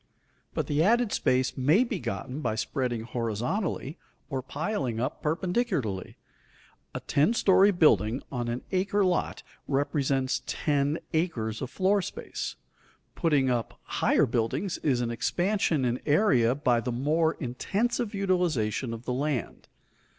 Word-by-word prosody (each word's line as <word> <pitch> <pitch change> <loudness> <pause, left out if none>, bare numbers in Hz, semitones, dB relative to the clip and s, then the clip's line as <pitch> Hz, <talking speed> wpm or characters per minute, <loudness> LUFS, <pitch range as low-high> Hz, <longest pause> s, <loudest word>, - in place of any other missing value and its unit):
But - - 0
the 150 +1 +1
added 230 +4 +3
space 130 0 +1
may 150 - +4
be 230 -6 -3
gotten 135 -2 -4
by 110 - -1
spreading 120 -1 -2
horizontally 125 - -2 0.3
or 135 -1 -1
piling 140 - -3
up 125 - -3
perpendicularly. 165 - -1 0.8
A - - -3
ten 155 +11 +2
story 195 -1 +5
building 145 - +3
on 120 -2 -2
an 120 +1 -3
acre 195 +1 +1
lot 180 -2 -1 0.2
represents 135 -2 0
ten 145 0 0 0.2
acres 120 -10 -1
of 130 - -3
floor 195 +6 +2
space. - - -5 0.6
Putting 140 -6 +2
up 120 -2 -2
higher - - +2
buildings 130 - -1
is 130 -5 +1
an 120 -1 -1
expansion 170 - 0
in 125 0 0
area 130 - +4
by 125 -5 +2
the 125 - -3
more 155 +6 +1
intensive 205 - -2
utilization 155 - 0
of 115 +2 -11
the 125 - -1
land. 140 -2 -2
140 Hz, 135 wpm, -28 LUFS, 125-180 Hz, 0.8 s, story